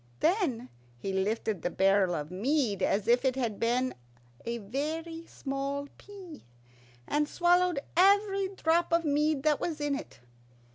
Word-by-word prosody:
Then 305 - 0 0.3
he 190 +11 -4
lifted 205 0 -1
the - - -1
barrel 190 -1 +3
of 150 +1 -5
mead 220 0 0
as 200 +3 +1
if 240 +1 +4
it 260 -1 +1
had 235 -6 -2
been 250 +2 +1 0.5
a 235 0 -2
very 315 +9 -4
small 275 +1 -4
pea, 380 -7 -12 0.6
and 295 0 0
swallowed 355 -1 +3 0.2
every 395 +2 +4
drop 340 -3 +1
of 335 0 +2
mead 295 -1 +1
that 300 -2 +2
was 320 -3 -3
in 290 -1 -1
it. 275 - -6
280 Hz, 145 wpm, -29 LUFS, 225-335 Hz, 0.6 s, if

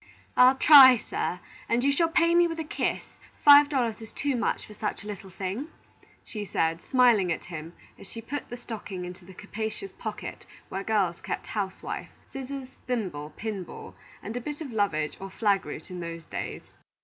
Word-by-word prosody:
"I'll 255 +1 +7
try, 265 -3 +9
sir, 180 -4 -3 0.3
and 235 +1 +2
you 280 - +4
shall 330 +4 +2
pay 335 0 +3
me 345 0 +5
with 330 -1 -5
a - - -1
kiss; 300 - -2 0.4
five 290 0 +9
dollars 240 -6 -1
is 220 - -10
too 280 -2 -1
much 235 - -1
for 210 - -12
such 210 -1 -4
a - - -10
little 200 -2 -7
thing," 195 - -4 0.6
she 210 -2 -6
said, 165 -4 0
smiling 235 -8 +4
at 165 - -3
him 165 -1 -7 0.3
as - - -12
she 230 - -8
put 265 +5 -6
the 245 - -6
stocking 210 -6 -6
into 180 0 -10
the 190 0 -13
capacious 220 - -5
pocket - - -7 0.2
where 195 +1 -4
girls 195 -6 +1
kept - - -4
housewife, 195 -3 -4 0.2
scissors, 270 0 -6 0.2
thimble, 180 -12 -3
pin 215 -4 -4
ball, - - -10 0.3
and 220 - -6
a 245 - -2
bit 295 +4 -5
of 300 -6 -6
lovage 165 -8 0
or 195 - -7
flag 200 0 +1
root - - -8
in 180 - -6
those 170 -1 -6
days. - - -6
220 Hz, 190 wpm, -27 LUFS, 190-265 Hz, 0.6 s, try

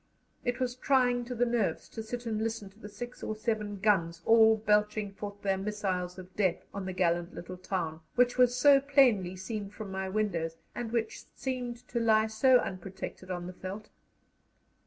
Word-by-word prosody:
It 245 0 -1
was 250 -1 0
trying 250 -2 +2
to 250 +1 -5
the 245 +1 +2
nerves 230 -8 0
to 225 - -6
sit 240 +2 -6
and 220 -2 -1
listen 225 -3 -3
to 205 - -23
the 210 - -9
six 240 +4 -8
or 215 - -3
seven 215 -2 -2
guns 170 -5 +1
all 225 -1 +6
belching 210 -1 +1
forth 205 0 -8
their 195 -1 +1
missiles 190 -3 -2
of 185 0 -11
death 190 -4 +1
on 200 -1 -4
the - - -2
gallant 175 -1 0
little 180 +1 -7
town, 175 -4 -3 0.2
which 245 0 +4
was 250 -1 +4
so 280 +2 +7
plainly 255 -10 +3
seen 200 +2 -5
from 205 -1 -8
my 190 0 -3
windows, 175 -6 -1 0.2
and 235 -2 -4
which 230 -2 -2
seemed 250 -2 -4
to 235 - -1
lie 220 -1 +4
so 250 +4 +5
unprotected 185 -2 -5
on 175 -1 -3
the 180 - -7
veldt. 195 +4 -7
210 Hz, 185 wpm, -30 LUFS, 190-240 Hz, 0.2 s, so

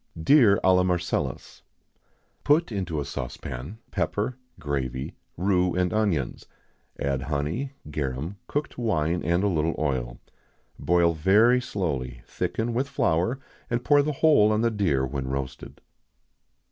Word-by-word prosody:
Deer 105 - +5
à 95 - +5
la 90 - +4
Marcellus. 90 -1 -2 0.8
Put 150 0 +3
into 90 -7 -2
a 70 - -3
saucepan 70 - -6
pepper, 110 +5 -1 0.2
gravy, 65 -3 -3 0.2
rue, 90 -1 +1
and 90 -1 +1
onions; 100 - -1 0.5
add 70 -2 -1
honey, 75 - -2 0.2
garum, 75 +6 -3
cooked 145 -3 -3
wine, 90 -7 0
and 85 +4 +1
a - - +3
little 80 -3 0
oil. 65 -5 -2 0.6
Boil 85 -1 +3
very 105 +10 +4
slowly, 65 - -3
thicken 115 +1 -2
with 130 +4 -1
flour, 105 -2 +1 0.3
and 120 +1 -1
pour 145 0 +5
the 150 +2 -1
whole 140 -8 +4
on 110 0 +1
the 115 0 +2
deer 85 -11 +1
when 65 0 -4
roasted. 65 -1 -5
90 Hz, 135 wpm, -26 LUFS, 70-110 Hz, 0.8 s, Deer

